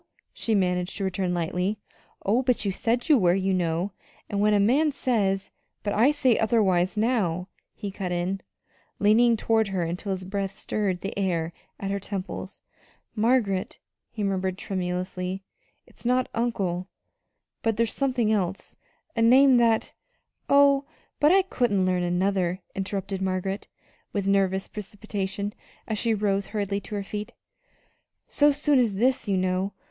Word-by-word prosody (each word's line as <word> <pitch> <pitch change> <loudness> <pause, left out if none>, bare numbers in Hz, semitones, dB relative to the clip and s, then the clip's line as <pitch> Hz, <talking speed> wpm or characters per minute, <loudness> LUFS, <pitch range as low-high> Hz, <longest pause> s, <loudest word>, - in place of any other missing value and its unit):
she 225 - 0
managed 180 -1 0
to 200 - -3
return 190 -1 -1
lightly. 180 +4 -1 0.5
"Oh, 220 +6 +3
but 250 -4 +1
you 200 - +1
said 235 +7 -1
you 300 -5 +6
were, 175 -2 +4
you 190 0 +1
know; 175 +1 0 0.4
and 200 -1 0
when 210 0 +4
a - - +4
man 275 +10 +3
says 205 -8 0 0.2
" - - -51
"But 205 - -1
I 235 +6 +5
say 270 -5 +2
otherwise 200 -4 +2
now," 195 -6 0 0.3
he 205 -2 -5
cut 190 -2 -4
in, 180 +2 -1 0.6
leaning 230 +3 +4
toward 220 -1 +2
her 190 -3 -1
until 180 +4 -3
his 190 -1 -3
breath 195 +1 -3
stirred 190 -4 -2
the 195 - -4
hair 170 -4 -1 0.3
at 195 0 -3
her 200 - -1
temples. 195 -1 -6 0.5
"Margaret," 215 -4 +1 0.3
he 215 - -5
murmured 190 -1 -1
tremulously, 185 0 -3 0.4
"it's - - -19
not 250 +1 +2
'uncle,' 195 -6 -1 0.7
but 225 -2 0
there's 230 -1 +1
something 255 -5 +1
else 195 -3 -1 0.4
a 230 - +1
name 260 +3 +6
that 230 -2 +2 0.3
" - - -49
"Oh, 280 -1 +4 0.4
but 295 +2 +5
I 385 +1 +5
couldn't 225 - +1
learn 180 -1 +1
another," 180 0 0
interrupted 195 0 -3
Margaret, 190 +1 -2 0.5
with 200 -2 -1
nervous 195 -1 +2
precipitation, 205 -1 -4 0.3
as 220 -2 -2
she 230 -2 +1
rose 200 -1 0
hurriedly 200 -1 -2
to 210 - -7
her 200 - -2
feet, 210 +1 -6 0.9
"so 290 0 +4
soon 290 -1 +3
as 225 -5 +2
this, 250 +3 +1
you 195 -2 +1
know! 185 +2 0
200 Hz, 155 wpm, -26 LUFS, 185-225 Hz, 0.9 s, you